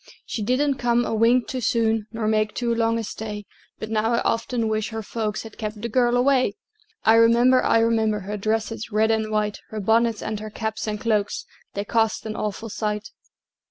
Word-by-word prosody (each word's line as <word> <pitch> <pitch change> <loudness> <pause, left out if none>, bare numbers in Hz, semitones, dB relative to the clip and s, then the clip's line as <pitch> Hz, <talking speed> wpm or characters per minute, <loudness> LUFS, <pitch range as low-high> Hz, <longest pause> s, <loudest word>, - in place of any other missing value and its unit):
She 225 - -4
didn't 260 +5 +1
come 240 0 +2
a - - -2
wink 230 +3 +3
too 255 - -3
soon, 225 -1 +1
Nor 225 -1 -2
make 215 -1 +1
too 240 -1 0
long 230 0 +1
a 230 - -2
stay; 210 -1 -6 0.3
But 220 - -6
now 225 +1 +1
I 235 - +2
often 230 0 0
wish 215 -1 -1
her 220 -1 -5
folks 215 -1 -3
Had 220 -1 -12
kept 215 -1 -4
the 235 +2 -4
girl 245 +1 +3
away! 255 -4 +3 0.5
I 220 - +6
remember, 235 +3 +5
I - - +4
remember, 220 -2 +1
Her 205 +2 -5
dresses, 220 +2 -2
red 220 +1 +3
and 220 -1 0
white, 210 -1 -1
Her 215 - -5
bonnets 225 +2 +2
and 215 -1 -3
her 215 0 -6
caps 220 0 -4
and 210 -1 -2
cloaks, 210 -2 0 0.3
They 200 +1 -2
cost 225 0 +1
an 215 -1 -4
awful 215 +2 -4
sight! 210 0 -3
220 Hz, 200 wpm, -23 LUFS, 215-230 Hz, 0.5 s, I